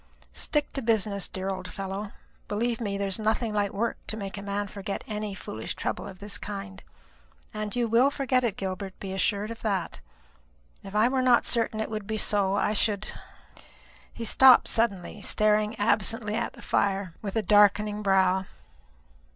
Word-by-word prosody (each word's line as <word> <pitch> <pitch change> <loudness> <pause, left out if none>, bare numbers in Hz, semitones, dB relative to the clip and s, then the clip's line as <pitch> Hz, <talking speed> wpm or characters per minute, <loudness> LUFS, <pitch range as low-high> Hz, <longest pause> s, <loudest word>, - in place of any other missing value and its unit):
Stick 295 -1 -1
to 270 - -2
business, 215 -4 0
dear 190 +1 -4
old 185 -1 -4
fellow. 195 +1 -5 0.4
Believe 230 +3 -1
me, 200 -3 -2
there 200 - -1
is 195 +2 -1
nothing 220 +1 0
like 205 -1 0
work 230 +4 -1
to 220 - -3
make 200 -2 -5
a 200 - -6
man 200 +1 -2
forget 200 0 -5
any 210 -2 -4
foolish 110 - -6
trouble - - -3
of 190 - -10
this 205 +1 -4
kind. 195 -1 -7 0.7
And 215 0 -4
you 240 -1 +1
will 235 +5 +4
forget 265 -3 +1
it, 225 -5 -1
Gilbert, 190 0 -5
be 190 -1 -5
assured 205 +3 0
of 230 - -8
that. 195 -6 -2 0.8
If 195 +1 -9
I 215 +2 +5
were 260 +1 +1
not 250 -2 +4
certain 230 -2 +1
it 220 - -3
would 215 -2 -4
be 220 0 -2
so, 200 -2 +2
I 205 +1 +1
should 210 -1 0 0.5
" - - -25
He 230 - -6
stopped 260 +2 +7
suddenly, 205 -6 0
staring 215 0 +2
absently 210 +1 +1
at - - -2
the - - -14
fire 195 -3 0
with 200 -3 -5
a 225 - +1
darkening 210 +1 +4
brow. 190 -1 +3
210 Hz, 180 wpm, -27 LUFS, 195-220 Hz, 0.8 s, stopped